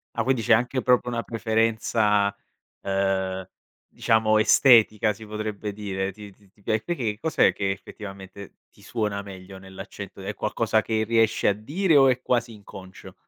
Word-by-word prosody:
Ah, -, -, 0 dB
quindi 130 Hz, -2 st, 0 dB
c'è 110 Hz, -, -2 dB
anche 125 Hz, +3 st, +1 dB
proprio 125 Hz, -1 st, +2 dB
una 120 Hz, -1 st, -3 dB
preferenza, 110 Hz, -2 st, 0 dB, 0.5 s
uhm, 95 Hz, -1 st, -1 dB, 0.4 s
diciamo 110 Hz, -1 st, +2 dB
estetica 110 Hz, -2 st, +5 dB
si 110 Hz, +2 st, -12 dB
potrebbe 105 Hz, -1 st, -5 dB
dire. 100 Hz, -2 st, -4 dB
Ti 105 Hz, +1 st, -12 dB
ti 100 Hz, 0 st, -26 dB
ti 100 Hz, +2 st, -29 dB
pia 110 Hz, +2 st, 0 dB
perché? 115 Hz, -7 st, -3 dB
Cos'è 160 Hz, +7 st, +2 dB
che 100 Hz, -1 st, -1 dB
effettivamente 95 Hz, 0 st, -10 dB
ti -, -, -23 dB
suona 105 Hz, -4 st, -3 dB
meglio 95 Hz, -1 st, -11 dB
nell'accento? 95 Hz, +1 st, -10 dB
È 100 Hz, +2 st, -5 dB
qualcosa 110 Hz, +1 st, 0 dB
che 110 Hz, -1 st, -1 dB
riesci 115 Hz, 0 st, +2 dB
a 100 Hz, -, +4 dB
dire 155 Hz, -, 0 dB
o 135 Hz, -2 st, +6 dB
è 125 Hz, 0 st, 0 dB
quasi 120 Hz, -2 st, 0 dB
inconscio? 95 Hz, -3 st, -12 dB
105 Hz, 160 wpm, -24 LUFS, 100-115 Hz, 0.5 s, o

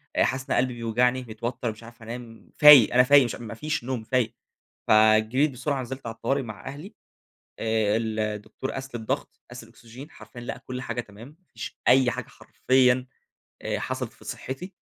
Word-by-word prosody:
آآ -, -, +4 dB
حاسس 130 Hz, 0 st, -1 dB
إن -, -, -4 dB
أنا -, -, +1 dB
قلبي 125 Hz, -, -6 dB
بيوجعني، 120 Hz, +2 st, +1 dB
متوتر 115 Hz, +1 st, -4 dB
مش 110 Hz, +2 st, -14 dB
عارف 115 Hz, 0 st, -14 dB
أنام، 115 Hz, 0 st, -10 dB
فايق 150 Hz, -6 st, +9 dB
أنا 125 Hz, +1 st, +6 dB
فايق 140 Hz, +1 st, +6 dB
مش 120 Hz, -, -3 dB
ما 115 Hz, -2 st, -8 dB
فيش 150 Hz, +3 st, -3 dB
نوم 125 Hz, -2 st, -3 dB
فايق. 120 Hz, -1 st, 0 dB, 0.5 s
فجريت 110 Hz, +6 st, +4 dB
بسرعة 135 Hz, +2 st, -2 dB
نزلت 130 Hz, +1 st, -7 dB
على 115 Hz, -1 st, -5 dB
الطوارئ 135 Hz, +4 st, -1 dB
مع 110 Hz, -5 st, -9 dB
أهلي، 155 Hz, +10 st, -9 dB, 0.6 s
آآ 110 Hz, -1 st, +1 dB
الدكتور 110 Hz, +2 st, -3 dB
قاس 135 Hz, -1 st, -7 dB
لي 120 Hz, -, -3 dB
الضغط، 110 Hz, -, -4 dB
قاس -, -, -9 dB
الأكسجين، 125 Hz, +6 st, -13 dB
حرفيًا 120 Hz, -, -12 dB
لقى 120 Hz, -, -6 dB
كل 125 Hz, 0 st, -7 dB
حاجة 125 Hz, -2 st, -3 dB
تمام، 110 Hz, +1 st, -13 dB
ما 165 Hz, +6 st, -20 dB
فيش -, -, -8 dB
أي 130 Hz, -1 st, +5 dB
حاجة -, -, -6 dB
حرفيًا 130 Hz, -1 st, +1 dB, 0.5 s
آآ -, -, -2 dB
حصلت -, -, -4 dB
في -, -, -19 dB
صحتي. 180 Hz, +9 st, -6 dB
125 Hz, 185 wpm, -25 LUFS, 115-130 Hz, 0.6 s, فايق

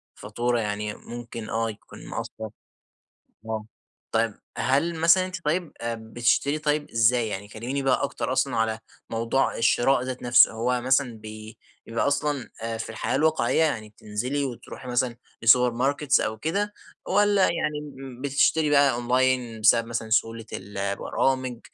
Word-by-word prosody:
الفاتورة 120 Hz, +3 st, -1 dB
يعني 105 Hz, -1 st, -2 dB
ممكن 115 Hz, -2 st, -8 dB
آه، 115 Hz, 0 st, 0 dB
يكون 105 Hz, -, -11 dB
مأثّر. 110 Hz, 0 st, -6 dB, 1.0 s
آه، 110 Hz, -1 st, -3 dB, 0.5 s
طيب 115 Hz, -1 st, +1 dB, 0.2 s
هل 140 Hz, +7 st, +1 dB
مثلًا 165 Hz, +3 st, +4 dB
أنتِ 185 Hz, -2 st, -7 dB
طيب 165 Hz, +2 st, -1 dB
آآ، 115 Hz, 0 st, -2 dB
بتشتري 120 Hz, +6 st, 0 dB
طيب 150 Hz, -1 st, -1 dB
إزاي؟ 115 Hz, +1 st, +3 dB
يعني 100 Hz, 0 st, -5 dB
كلّميني 120 Hz, +6 st, -4 dB
بقى 135 Hz, -2 st, +2 dB
أكتر -, -, -2 dB
أصلًا -, -, +1 dB
على 110 Hz, 0 st, 0 dB, 0.3 s
موضوع 115 Hz, +4 st, 0 dB
الشراء 120 Hz, +3 st, +3 dB
ذات 130 Hz, 0 st, -5 dB
نفسه، 120 Hz, 0 st, +6 dB
هو 120 Hz, +3 st, 0 dB
مثلًا 130 Hz, -2 st, +1 dB
ب 110 Hz, 0 st, -9 dB, 0.3 s
بيبقى 115 Hz, 0 st, -1 dB
أصلًا 140 Hz, -4 st, -1 dB
آآ، 115 Hz, 0 st, -3 dB
في 115 Hz, -, -5 dB
الحياة 110 Hz, -, -2 dB
الواقعية 160 Hz, +1 st, +2 dB
يعني 115 Hz, -9 st, -1 dB
بتنزلي 115 Hz, +7 st, -3 dB
وتروحي 130 Hz, 0 st, -7 dB
مثلًا 125 Hz, -1 st, 0 dB, 0.3 s
السوبر 125 Hz, +2 st, +6 dB
ماركتس 140 Hz, +2 st, +2 dB
أو 110 Hz, -, -2 dB
كده 200 Hz, -, -1 dB, 0.4 s
والّا 205 Hz, 0 st, +3 dB
يعني 150 Hz, -4 st, +1 dB, 0.2 s
امم، 130 Hz, -2 st, -9 dB
بتشتري 145 Hz, +3 st, +2 dB
بقى 140 Hz, -2 st, +5 dB
أونلاين 125 Hz, -1 st, +1 dB
بسبب 115 Hz, +2 st, +5 dB
مثلًا 115 Hz, -1 st, -4 dB
سهولة 115 Hz, +1 st, +1 dB
ال 100 Hz, +1 st, -7 dB
البرامج 125 Hz, +5 st, -1 dB
120 Hz, 150 wpm, -25 LUFS, 115-140 Hz, 1.0 s, نفسه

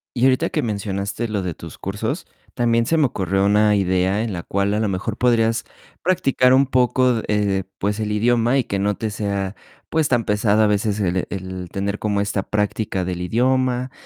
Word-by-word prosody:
Y 120 Hz, -, +1 dB
ahorita 135 Hz, +6 st, +3 dB
que 150 Hz, -, -1 dB
mencionaste 100 Hz, +1 st, -3 dB
lo 105 Hz, -3 st, -2 dB
de 90 Hz, -3 st, -3 dB
tus -, -, -11 dB
cursos, -, -, -3 dB, 0.3 s
también 115 Hz, -1 st, +2 dB
se 165 Hz, -, +2 dB
me 150 Hz, -3 st, +4 dB
ocurrió 95 Hz, -3 st, 0 dB
una 105 Hz, +1 st, +4 dB
idea 95 Hz, +2 st, +1 dB
en 115 Hz, -3 st, -3 dB
la 85 Hz, -2 st, -4 dB
cual 100 Hz, +1 st, 0 dB
a 105 Hz, -, 0 dB
lo 110 Hz, -, +1 dB
mejor 100 Hz, +3 st, -3 dB
podrías 115 Hz, -2 st, +2 dB, 0.4 s
practicar 135 Hz, -8 st, +3 dB
un 135 Hz, +1 st, +4 dB
poco, 125 Hz, -2 st, +2 dB
eh, 100 Hz, -3 st, +1 dB
pues, 105 Hz, +2 st, -1 dB
el 105 Hz, -1 st, -2 dB
idioma 120 Hz, +4 st, +2 dB
y 125 Hz, -, +1 dB
que 100 Hz, -, -3 dB
no 105 Hz, 0 st, 0 dB
te 110 Hz, -2 st, -3 dB
sea, 100 Hz, -2 st, -2 dB, 0.4 s
pues, 160 Hz, -2 st, +1 dB
tan 120 Hz, -3 st, +1 dB
pesado 105 Hz, 0 st, +2 dB
a -, -, +5 dB
veces 105 Hz, 0 st, 0 dB
el 90 Hz, -1 st, 0 dB
el 95 Hz, -2 st, -6 dB
tener 100 Hz, +1 st, -2 dB
como 105 Hz, -1 st, 0 dB
esta 100 Hz, -1 st, -1 dB
práctica 105 Hz, -2 st, -1 dB
del 90 Hz, -1 st, -4 dB
idioma, 125 Hz, +4 st, +1 dB
105 Hz, 195 wpm, -21 LUFS, 100-120 Hz, 0.4 s, a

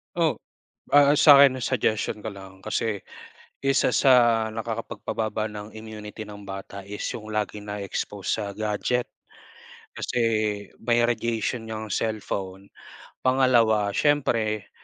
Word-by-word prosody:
Oh, -, -, +1 dB, 0.5 s
ah, 145 Hz, 0 st, +6 dB
sa'kin, 140 Hz, -3 st, +8 dB
ang 130 Hz, -, -5 dB
suggestion 110 Hz, 0 st, 0 dB
ko 110 Hz, -, -7 dB
lang 95 Hz, -1 st, -12 dB
kasi, 105 Hz, +1 st, -2 dB, 0.6 s
isa 135 Hz, -2 st, +2 dB
sa 135 Hz, 0 st, +5 dB, 0.4 s
nakakapagpababa 110 Hz, -1 st, -3 dB
ng 105 Hz, 0 st, -7 dB
immunity 110 Hz, 0 st, -8 dB
ng 105 Hz, -1 st, -11 dB
bata 95 Hz, 0 st, -7 dB
is 105 Hz, +1 st, -6 dB
yung 110 Hz, -1 st, -7 dB
laging 105 Hz, 0 st, -3 dB
na-e-expose 100 Hz, 0 st, -4 dB
sa 105 Hz, -, -2 dB
gadget. 110 Hz, +3 st, -1 dB, 0.8 s
Kasi -, -, -3 dB, 0.6 s
may 120 Hz, +1 st, +3 dB
radiation 115 Hz, 0 st, -2 dB
yang 110 Hz, 0 st, -5 dB
cellphone. 100 Hz, -3 st, -3 dB, 0.6 s
Pangalawa, 120 Hz, -5 st, +3 dB
siyempre, 115 Hz, -5 st, +1 dB
110 Hz, 115 wpm, -25 LUFS, 105-120 Hz, 0.8 s, sa'kin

